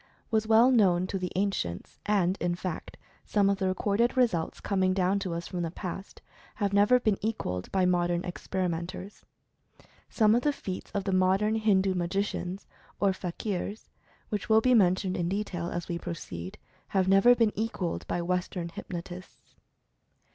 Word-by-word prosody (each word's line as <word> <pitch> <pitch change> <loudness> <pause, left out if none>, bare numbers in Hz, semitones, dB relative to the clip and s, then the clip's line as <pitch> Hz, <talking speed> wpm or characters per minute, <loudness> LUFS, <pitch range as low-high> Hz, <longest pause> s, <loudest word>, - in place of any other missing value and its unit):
was 220 -1 +1
well 225 +3 +6
known 185 -7 +4
to 195 +1 -3
the 180 -1 -3
an 200 +2 +2
cients, 85 - -5
and, 190 -3 +2
in 175 0 0
fact, 180 -1 -6 0.3
some 200 -2 +2
of 200 - -1
the 190 - +1
recorded 205 +6 +1
results 200 -11 +1
com 195 -2 -1
ing 185 0 +3
down 190 +1 +2
to 195 -3 -4
us 170 0 -4
from 180 - -4
the 170 - -1
past, 185 +2 -7 0.3
have 200 -2 -1
never 205 +5 +5
been 215 -5 +1
equalled 90 - -3
by 190 -1 +2
modern 175 -1 +1
experimentors. 180 +1 -4 0.9
Some 215 -2 +4
of 240 - +3
the 295 - +2
feats 185 -8 -6
of 200 - -1
the 195 - -1
modern 190 +3 +3
Hindu 200 -4 +2
magicians, 185 +1 -2 0.3
or 200 -1 +3
fakirs, 195 +3 -4 0.4
which 210 0 -3
will 220 0 +6
be 255 +3 +3
men 185 -6 +5
tioned 185 0 -3
in 170 -1 -1
detail, 185 -3 -3
as 175 -1 -4
we 170 -1 -3
proceed, 90 - -6 0.3
have 190 -2 +1
never 195 +6 +6
been 230 -3 +3
equalled 210 -5 -3
by 175 - -1
Western 180 -1 -2
hypnotists. 175 +1 -9
190 Hz, 170 wpm, -28 LUFS, 175-210 Hz, 0.9 s, well